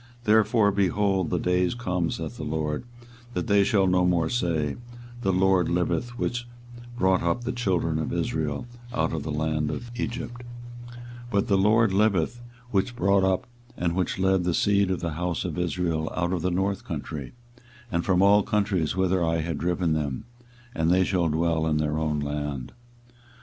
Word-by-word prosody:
24:023:007 - - -27
Therefore, 110 -1 +4
behold, 95 -2 +1
the 90 - 0
days 90 +2 +1
come, 90 -8 -1
saith - - -5
the - - -6
LORD, 75 +4 -2 0.5
that - - -1
they 100 -3 +4
shall 100 -2 +3
no 90 -1 +3
more 85 -2 +2
say, 80 - 0 0.5
The 95 - +1
LORD 95 -1 +3
liveth, 120 +8 -1
which 120 0 -2 0.5
brought 95 -3 +3
up 85 +9 0
the 125 - -2
children 90 -9 0
of 80 - -3
Israel 75 0 -2 0.3
out 120 - 0
of 80 - -2
the 80 - -5
land 75 0 -1
of 120 0 -5
Egypt; 120 0 -4 0.5
24:023:008 120 - -12 0.3
But, 100 -3 +1
The 100 - +4
LORD 110 +1 +4
liveth, 105 +2 +1 0.3
which 105 +5 0
brought 100 -4 +3
up 95 +6 +1 0.3
and 85 -1 0
which 90 -1 -1
led 95 -1 +2
the 90 -1 0
seed 100 -1 +2
of 95 - -1
the 85 -2 -2
house 85 +2 -2
of 85 -2 -3
Israel 85 -2 -1
out 90 0 0
of 90 - -1
the 90 - 0
north 95 +2 -1
country, 70 -4 -6 0.6
and 85 -2 0
from 95 0 +3
all 100 +1 +6
countries 100 -7 0
whither 95 -1 +1
I 80 0 +1
had 80 -2 -3
driven 85 0 0
them; 75 +1 -2 0.5
and 80 0 +1
they 90 +1 +4
shall 90 -2 +1
dwell 80 0 +1
in 75 -1 +1
their 75 0 0
own 75 -1 0
land. 75 -3 -4
90 Hz, 180 wpm, -26 LUFS, 80-100 Hz, 0.6 s, all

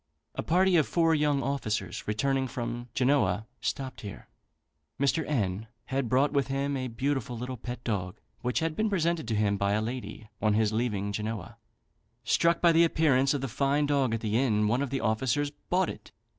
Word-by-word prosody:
A - - -3
party 180 +2 +3
of 155 - +3
four 165 -1 +3
young 150 -3 +2
officers, 135 -5 -2
returning 130 +5 0
from 120 0 -5
Genoa, 115 -7 +2
stopped 130 +2 -3
here. 100 -2 -9 0.7
Mr. 140 +4 +2
N 110 -6 -1 0.3
had 135 -3 0
brought 135 +4 +3
with 140 -2 +1
him 140 +1 -1
a 130 -1 -2
beautiful 125 0 -2
little 125 +2 -4
pet 120 +1 -7
dog, 100 -3 -2 0.2
which 125 +3 0
had 160 -1 -1
been 220 +3 +1
presented 170 - 0
to 110 - 0
him 105 -1 +1
by 100 0 +1
a 105 - +2
lady 110 -2 -5
on 105 0 +3
his 110 -1 +2
leaving 105 -3 -1
Genoa. 105 -1 -4 0.7
Struck 170 0 +2
by 170 - +6
the 165 +1 +5
appearance 145 -4 +3
of 140 - -2
the 135 - -2
fine 140 +4 +1
dog 140 -5 +1
at 115 - -4
the 110 +1 +1
inn, 105 -5 +2
one 120 +5 +1
of 140 - -1
the 135 0 -2
officers 130 +6 0 0.2
bought 185 +1 +2
it. - - -8
130 Hz, 190 wpm, -28 LUFS, 110-145 Hz, 0.7 s, by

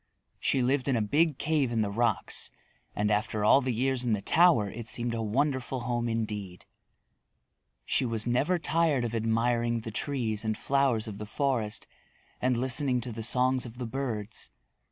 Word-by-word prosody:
She 130 - +1
lived 130 +1 +1
in 135 - +2
a 115 - +1
big 150 +6 +2
cave 150 -5 0
in 115 -2 +1
the 100 -2 -1
rocks, 115 0 0 0.5
and 105 +1 0
after 105 0 0
all 135 - +6
the 130 - -1
years 130 +2 0
in 120 -3 +1
the 105 - -1
tower 165 - +4
it 115 +3 -7
seemed 120 +1 -1
a 115 - -2
wonderful 130 +3 -1
home 120 0 -1
indeed. 105 -5 -4 1.2
She - - +1
was 115 -3 -2
never 135 +9 +1
tired 160 -6 +1
of 115 - -4
admiring 115 +1 0
the 110 - -6
trees 110 -3 -1
and 110 -1 -1
flowers 135 -6 +1
of 105 -2 -7
the 105 - -6
forest 115 -4 -1 0.6
and 125 -1 +1
listening 130 +1 +2
to 120 - -4
the 115 0 -6
songs 125 +3 +3
of 120 -1 -8
the 125 - -4
birds. 115 -4 -4
120 Hz, 175 wpm, -28 LUFS, 110-130 Hz, 1.2 s, all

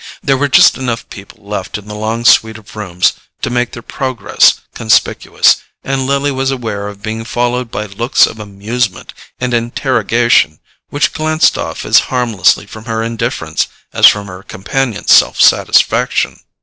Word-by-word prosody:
There 135 -2 +2
were 145 +2 0
just 140 - +5
enough 120 -3 -3
people 100 +1 -13
left 105 -2 -4
in 105 0 -13
the 105 - -7
long 110 +2 -3
suite 110 -1 +4
of 110 -1 -16
rooms 90 -4 0 0.3
to - - -1
make 120 0 -1
their 115 -3 -9
progress 130 -6 +1
conspicuous, 110 -1 +2 0.3
and 135 -1 -2
Lily 140 +1 0
was 135 0 -1
aware 110 -6 -4
of 100 0 -10
being 110 +1 -4
followed 120 +1 -2
by 105 - -4
looks 110 +5 +2
of 110 - -8
amusement 105 +1 -4 0.3
and 125 -1 -2
interrogation, 120 - +1 0.3
which 145 - 0
glanced 155 0 +1
off - - -5
as - - +5
harmlessly 115 -7 +1
from 110 +2 -12
her 115 -1 -2
indifference 115 -1 -2 0.3
as - - +7
from 105 -1 +2
her 90 -1 -10
companion's 105 +2 -3
self - - +4
satisfaction. - - +2
115 Hz, 160 wpm, -14 LUFS, 105-125 Hz, 0.3 s, as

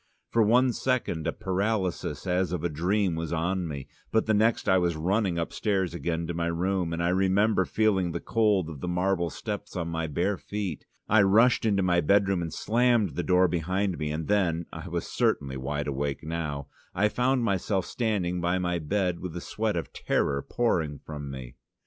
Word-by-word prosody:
For 115 - +3
one 120 +4 +4
second 115 -13 -1
a - - +1
paralysis 100 -1 -2
as 90 -1 +1
of 90 -3 -2
a 85 - +1
dream 90 +5 +1
was 80 0 -3
on 90 +2 -1
me, 70 -4 -6 0.2
but 110 - +2
the 110 - +2
next 110 +2 +2
I 95 - +5
was 85 -2 +1
running 95 +3 0
upstairs 95 +1 -1
again 85 -1 -2
to 85 - -3
my 85 0 -1
room, 90 +1 0
and 85 +1 -2
I 85 - +2
remember 95 +2 +3
feeling 95 -3 +1
the - - -3
cold 105 -6 +2
of 80 -4 -8
the - - -3
marble 90 -1 +1
steps 105 +1 -6
on 85 -2 -2
my 80 0 -2
bare 90 +7 0
feet. 100 -6 -5 0.2
I 105 0 +5
rushed 115 +6 +4
into 100 -3 +2
my 90 -1 +3
bedroom, 95 +2 +3
and 85 -1 -3
slammed 120 -2 +2
the - - -2
door 90 0 +4
behind 90 +3 -1
me, 75 - -2
and 75 +1 -3
then 85 -5 +1
I - - -7
was - - -3
certainly 70 -2 0
wide 70 +3 -3
awake 70 0 -2
now 75 -3 -3 0.3
I 105 +3 +3
found 125 +3 +1
myself 95 -2 0
standing 95 -7 -1
by 90 +2 +1
my 90 -1 -1
bed 90 +2 -1
with 90 -3 -6
the 90 - -4
sweat 110 +2 -2
of 85 - -4
terror 70 0 0
pouring 80 -12 0
from 75 0 -7
me. 65 -1 -8
90 Hz, 195 wpm, -27 LUFS, 80-105 Hz, 0.3 s, I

